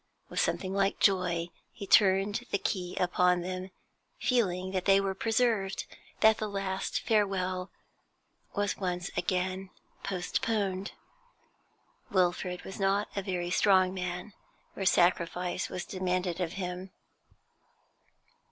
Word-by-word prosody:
With - - -2
something 190 0 0
like 195 0 +1
joy 180 -3 +2 0.2
he 200 - -8
turned 200 +4 +4
the - - +1
key 180 -2 -3
upon 180 0 +3
them, 185 +1 -4 0.5
feeling 190 -7 +1
that 185 -1 -2
they 195 0 +6
were 195 -1 0
preserved, 220 -2 +1 0.4
that 220 0 +6
the 215 - -2
last 195 -1 -2
farewell 190 -3 0 0.9
was 205 -1 0
once 180 -1 -2
again 185 +1 -1 0.3
postponed. 195 +1 -1 1.2
Wilfrid 180 -1 0
was 190 - -8
not 195 +1 +1
a 200 - 0
very 180 -2 -3
strong 185 -1 +4
man 180 +2 -4 0.4
where 195 - -2
sacrifice 175 0 +2
'was 180 0 -4
demanded 185 -1 -1
of 170 -1 -2
him. 180 0 -4
185 Hz, 115 wpm, -30 LUFS, 180-195 Hz, 1.2 s, they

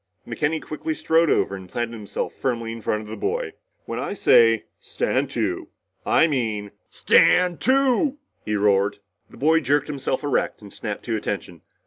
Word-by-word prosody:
McKenny 155 +2 -1
quickly 155 +1 -4
strode 165 +1 +2
over 100 - +1
and 95 -2 -10
planted 120 +2 -3
himself 105 -3 -5
firmly 115 -3 -2
in 115 0 -7
front 105 0 -1
of - - -12
the 110 - -6
boy. 455 +1 -2 0.3
"When - - -4
I - - -3
say 115 - +5
stand - - -1
to, - - -2 0.4
I - - +5
mean 110 -9 -2 0.2
stand 180 -1 +4
to!" 270 +2 +2 0.3
he 105 - -2
roared. 100 0 +2 0.3
The - - -15
boy 160 +3 +4
jerked 145 0 +1
himself 135 -2 -2
erect 145 -2 0
and 100 -2 -13
snapped 105 -2 -6
to 115 - -1
attention. 100 -5 -4
120 Hz, 165 wpm, -23 LUFS, 105-160 Hz, 0.4 s, say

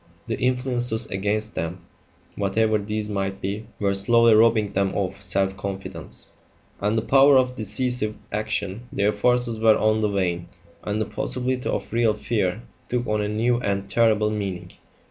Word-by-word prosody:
The - - -3
influences 125 -2 0
against 105 +2 -1
them, 85 +3 -4 0.5
whatever 110 +2 +1
these 105 +1 -3
might 95 -2 -2
be, 105 +3 -4
were 100 -1 +1
slowly 115 +3 +4
robbing 110 -1 +4
them 95 0 0
of 95 -2 -2
self 95 0 0
confidence, 95 -5 -6 0.5
and 105 +3 0
the 110 - 0
power 135 +2 +6
of 125 -1 +2
decisive 110 0 -2 0.2
action; 105 +1 -3
their 100 +1 +1
forces 120 +1 +1
were 110 -1 +5
on 110 0 +2
the 105 - +2
wane, 90 -4 -1 0.3
and 105 +1 -2
the 110 - 0
possibility 125 +3 -2
of - - -3
real 115 -2 +3
fear 105 -1 -1 0.3
took 125 0 -1
on 105 -1 0
a 105 - -1
new 120 +3 +1
and 100 -3 -2
terrible 110 -2 +3
meaning. 100 -4 -4
105 Hz, 160 wpm, -24 LUFS, 100-115 Hz, 0.5 s, power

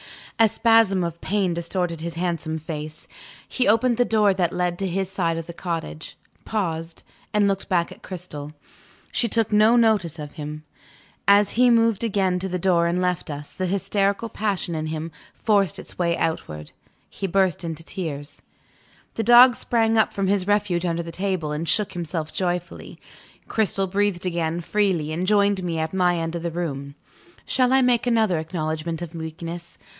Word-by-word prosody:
A 225 - +7
spasm 220 -4 +3
of 170 -1 -5
pain 195 -3 0
distorted 170 -1 -2
his 170 0 -4
handsome 165 -2 -2
face. 155 -1 -7 0.4
He 255 - 0
opened 230 +3 +3
the 245 - +4
door 210 -3 +3
that 180 -3 0
led 180 -1 -1
to 195 - -1
his 190 +1 -1
side 170 -4 0
of 165 - -4
the 170 - -8
cottage 165 - -5 0.3
paused 165 -6 -3 0.3
and 210 -1 +3
looked 195 -1 -2
back 175 -3 +1
at - - -13
Cristel. 155 -5 -7 0.6
She 235 - +2
took 225 -1 +1
no 215 +3 +5
notice 215 -9 +2
of 150 -2 -7
him. 150 -1 -7 0.6
As 200 0 +5
he 250 +1 +4
moved 230 -2 +3
again 195 -5 +1
to 190 +1 -1
the 180 - -1
door 175 -2 +2
and 175 +1 0
left 180 -2 -1
us, 145 0 -7
the 185 - -2
hysterical 200 +3 0
passion 200 -5 -2
in 155 -1 -3
him 160 +1 -4 0.2
forced 200 -6 +2
its - - -10
way 170 -1 +1
outward 75 - -3 0.4
he 195 - -4
burst 185 -2 +1
into 165 -1 -5
tears. 145 -5 -5 0.7
The - - -2
dog 240 +2 +8
sprang 225 -1 +1
up 220 - +3
from 195 - -2
his 190 -1 +1
refuge 200 -4 +1
under 170 0 -1
the 165 - -7
table, 185 -3 -2
and 155 +2 -2
shook 210 -3 +2
himself 165 -2 -4
joyfully. 175 -1 -3 0.5
Cristel 200 -3 +1
breathed 195 -1 0
again 170 -1 -1
freely, 180 -5 0
and 175 +4 -2
joined 200 -1 +3
me 170 -2 -2
at 160 +1 -2
my 180 -2 +2
end 165 0 -3
of 170 - -3
the 170 - -2
room. 140 -5 -4 0.5
Shall 255 -1 +2
I 265 0 +5
make 250 -1 +2
another 220 -8 +2
acknowledgment 160 0 -3
of 170 -1 -8
weakness? 165 +1 -7
180 Hz, 180 wpm, -23 LUFS, 165-205 Hz, 0.7 s, dog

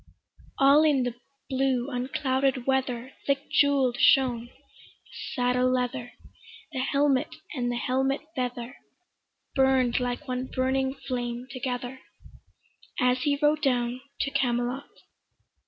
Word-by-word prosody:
All 275 +2 +6
in 295 -4 +3
the 245 -1 -2 0.3
blue 265 -1 0
unclouded 260 0 0
weather 265 -1 -1
Thick 280 0 0
jewell'd 275 -4 +3
shone 245 -3 +4
the - - -22 0.8
saddle 250 -1 +2
leather, 250 -1 -2 0.6
The 265 - -4
helmet 275 +2 +1 0.2
and 245 -4 -1
the - - -2
helmet 265 +3 0
feather 250 0 -4 0.8
Burn'd 265 -3 +3
like 250 +3 -3
one 255 0 -2
burning 265 +1 0
flame 245 -3 -4
together, 255 0 -4 1.0
As 250 -1 +2
he 285 0 +1
rode 300 +1 +3
down 245 -2 0 0.2
to 280 - -1
Camelot. 245 +1 -1
260 Hz, 115 wpm, -27 LUFS, 245-270 Hz, 1.0 s, All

